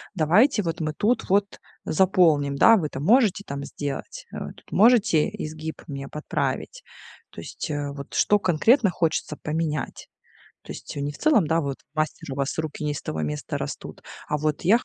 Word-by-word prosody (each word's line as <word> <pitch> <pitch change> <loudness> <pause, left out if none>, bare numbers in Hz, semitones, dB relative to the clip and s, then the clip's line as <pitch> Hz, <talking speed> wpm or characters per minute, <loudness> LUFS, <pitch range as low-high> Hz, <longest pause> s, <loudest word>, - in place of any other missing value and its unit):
давайте 200 - +4
вот 165 -1 -3
мы 155 -1 -2
тут 220 +10 0
вот 200 +1 +1 0.3
заполним, 155 -6 +3
да, 225 +10 +7
вы 160 -6 -1
это 135 - -7
можете 205 - +3
там 140 0 -5
сделать? 140 -1 -6
Э, - - -5
тут - - -20
можете 210 -7 +4
изгиб 155 +1 -6
мне 140 -1 -6
подправить?" 155 - -3 0.5
То - - -9
есть, - - -6
э, 145 -1 -3
вот 140 -1 -9
что 210 - +3
конкретно 200 - +3
хочется 165 -3 -1
поменять. 155 -3 -3 0.6
То - - -8
есть, - - -9
э, - - -3
не 145 +1 -2
в - - -13
целом, 270 - +3
да, 165 +2 +2
вот: 140 -3 -4 0.2
"Мастер, 155 -2 -3
у - - -5
вас 140 -1 -2
руки 155 -1 -4
не 150 - 0
из 145 - -6
того 80 - -4
места 75 0 -3
растут". - - -7 0.3
А 150 - 0
вот: 150 0 -1
"Я 205 +7 +5
хо - - -12
155 Hz, 190 wpm, -24 LUFS, 145-195 Hz, 0.6 s, да